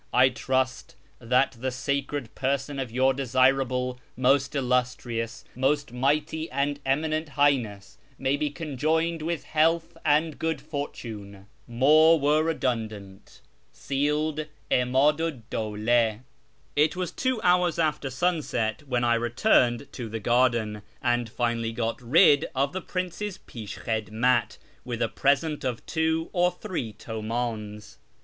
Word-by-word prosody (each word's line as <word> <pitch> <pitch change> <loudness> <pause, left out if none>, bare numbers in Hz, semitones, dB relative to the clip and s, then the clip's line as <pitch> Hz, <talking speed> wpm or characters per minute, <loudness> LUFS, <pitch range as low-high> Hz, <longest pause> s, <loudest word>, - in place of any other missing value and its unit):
I 130 +1 +5
trust 130 +1 -2 0.2
that 125 +1 +1
the 130 +2 -1
sacred 140 0 -3
person 140 +1 -2
of 130 -3 -3
Your 130 +3 +2
desirable, 130 -1 +1 0.2
most 135 +2 +2
illustrious, 125 -3 -1
most 140 +2 0
mighty, 150 +5 0
and 140 +2 -1
eminent 155 +3 0
Highness 125 -9 0 0.2
may 135 +1 +1
be 150 +1 -1
conjoined 160 +3 -1
with 165 +1 -2
health 165 +2 +1
and 155 +1 +2
good 160 -2 -1
fortune. 115 -9 -7 0.2
More 155 +7 +5
were 150 +2 +3
redundant." 110 -11 -3 0.3
{Sealed) 150 +3 -1 0.2
'Imadu 140 +6 +3
'd 115 -4 -18
Dawla. 110 +1 +1 0.5
It 150 +3 +3
was 180 -2 -3
two 255 -3 -1
hours 180 -2 +3
after 155 -4 0
sunset 130 -7 -1
when 125 -2 0
I 120 -1 +3
returned 120 - +2
to 120 -4 -6
the 110 +1 -4
garden, 115 -2 +1 0.2
and 120 -1 +1
finally 115 -1 -1
got 115 +2 -2
rid 145 +4 +5
of 140 +2 0
the 185 - -3
prince's 185 +3 -4
jpishkkiclmat 110 +1 -1 0.3
with 120 -2 -4
a - - +1
present 150 +2 +1
of 125 -3 -3
two 160 0 -1
or 180 0 +3
three 180 - -5
Uimdns. 110 -1 -5
130 Hz, 125 wpm, -26 LUFS, 120-155 Hz, 0.5 s, I